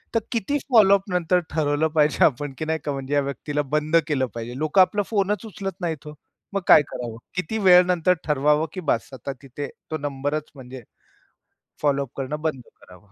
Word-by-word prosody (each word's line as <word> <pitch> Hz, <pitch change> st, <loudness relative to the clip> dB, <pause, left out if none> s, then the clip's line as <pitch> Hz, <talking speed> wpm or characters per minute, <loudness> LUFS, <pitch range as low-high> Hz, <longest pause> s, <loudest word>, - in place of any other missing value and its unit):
तर -, -, +5 dB
किती 235 Hz, +5 st, 0 dB
फॉलोअपनंतर 195 Hz, -5 st, +4 dB
ठरवलं 150 Hz, 0 st, +1 dB
पाहिजे 150 Hz, -1 st, +2 dB
आपण, 145 Hz, 0 st, 0 dB
की 155 Hz, -, -3 dB
नाही 160 Hz, 0 st, -1 dB
का, 145 Hz, -, -1 dB
म्हणजे 135 Hz, 0 st, -4 dB
या 145 Hz, -, +3 dB
व्यक्तीला 145 Hz, +1 st, -3 dB
बंद 150 Hz, +1 st, 0 dB
केलं 140 Hz, -4 st, +1 dB
पाहिजे. 120 Hz, +2 st, -6 dB
लोकं 155 Hz, +6 st, +3 dB
आपला 205 Hz, +2 st, +2 dB
फोनच 205 Hz, -1 st, 0 dB
उचलत 195 Hz, -3 st, -6 dB
नाहीत 160 Hz, -4 st, -3 dB
हो. 150 Hz, -, -7 dB, 0.4 s
मग 195 Hz, -, 0 dB
काय -, -, +8 dB
करावं? 115 Hz, -2 st, -6 dB, 0.2 s
किती 185 Hz, +4 st, -2 dB
वेळानंतर 180 Hz, -1 st, +5 dB
ठरवावं, 150 Hz, +1 st, +2 dB
की 185 Hz, -, -5 dB
बास 115 Hz, -, -1 dB
आता 130 Hz, +2 st, -6 dB
तिथे 140 Hz, +1 st, -6 dB, 0.2 s
तो 155 Hz, -, -1 dB
नंबरच 145 Hz, +1 st, -3 dB
म्हणजे 130 Hz, -1 st, -10 dB, 1.0 s
फॉलोअप 140 Hz, -2 st, +1 dB
करणं 145 Hz, +3 st, -4 dB
बंद 155 Hz, -5 st, -2 dB, 0.2 s
करावं? 90 Hz, +2 st, -18 dB
150 Hz, 175 wpm, -23 LUFS, 140-180 Hz, 1.0 s, काय